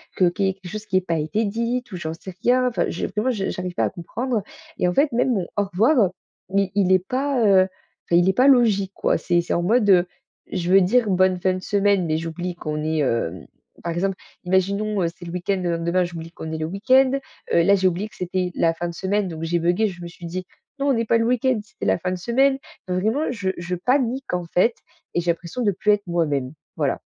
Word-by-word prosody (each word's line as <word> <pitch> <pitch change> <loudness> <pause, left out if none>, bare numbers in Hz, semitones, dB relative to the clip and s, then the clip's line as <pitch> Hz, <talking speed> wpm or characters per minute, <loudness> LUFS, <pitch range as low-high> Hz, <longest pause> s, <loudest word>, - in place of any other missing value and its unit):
que 185 - +3
qu'il 195 +3 -1
y - - +3
ait - - -1
quelque 190 -1 -11
chose 215 +1 -6
qui 195 -3 +1
ait - - +2
pas 170 -2 -2
été 205 +9 -1
dites 235 +3 -2
ou 185 - -5
j'en 160 -2 -4
sais 180 +3 -9
rien. 250 +1 +3
Enfin, 235 - 0
je - - -3
vraiment, 225 +4 -1
je 200 -5 -2
j'arrive 180 -1 -4
pas - - +1
à - - 0
comprendre 220 +6 -3 0.3
et 180 - +1
en 180 - +1
fait, 280 +8 +3
même 245 +2 +2
mon 185 -6 -1
«au 205 - +3
revoir» 205 - +3 0.4
mais 195 -1 +2
il 195 -2 +3
est 185 - +5
pas, 265 +1 0
heu, 195 -2 +6
enfin, 185 -2 -6
il 175 +2 +4
est - - +3
pas 255 +7 +4
logique, 220 -8 +4
quoi. - - +1
C'est 175 -1 +1
c'est 170 - -3
en 175 - 0
mode, 215 +3 +3
heu, 180 -2 +6 0.5
je 180 -1 -1
veux 195 - +8
dire: 220 +4 +3
«Bonne 185 -1 +3
fin 185 +1 +1
de 185 - -3
semaine» 200 -2 +2
mais 155 0 +1
j'oublie 165 +2 -4
qu'on 150 -2 -4
est, 155 0 0
hem 115 - -1 0.4
par 170 - -2
exemple, 190 +3 -1 0.3
imaginons, 200 +3 +1
heu, - - +2
c'est 175 - -12
le 170 - -6
week-end, 180 +2 -1
le 170 -2 0
lendemain 170 +2 +1
j'oublie 165 -1 -8
qu'on 160 -2 -7
est - - -2
le 155 - -1
week-end. 255 +9 +3 0.4
Heu, 170 - +5
là, 200 - +5
j'ai 190 -1 +2
oublié 185 +4 -3
que - - -19
c'était 180 0 -2
la 165 -1 +2
fin 175 +1 -3
de - - -7
semaine 195 +2 0
donc 160 -3 -6
j'ai 170 +1 0
buggé, 175 +6 +2
je 180 -3 -8
me - - -5
suis 170 0 -11
dit: 180 +2 -5 0.3
«Non, 280 +1 +1
on - - +4
n'est 230 -1 0
pas 230 - +3
le 230 - +1
week-end, 250 0 +2
c'était 210 - -9
la - - +3
fin 180 +2 -2
de 185 - -2
semaine». 265 +8 +2 0.3
Non, 180 0 -1
vraiment, 220 +10 0
je 205 -6 -2
je 175 +1 -4
panique, 255 +5 0
en 180 -1 -3
fait 185 +7 +2 0.4
et - - +3
j'ai 175 0 +2
l'impression 170 +8 -5
de 205 - +3
plus 210 +3 +1
être 205 -1 -2
moi-même, 145 -6 -1 0.2
voilà. - - 0
190 Hz, 255 wpm, -23 LUFS, 175-220 Hz, 0.5 s, veux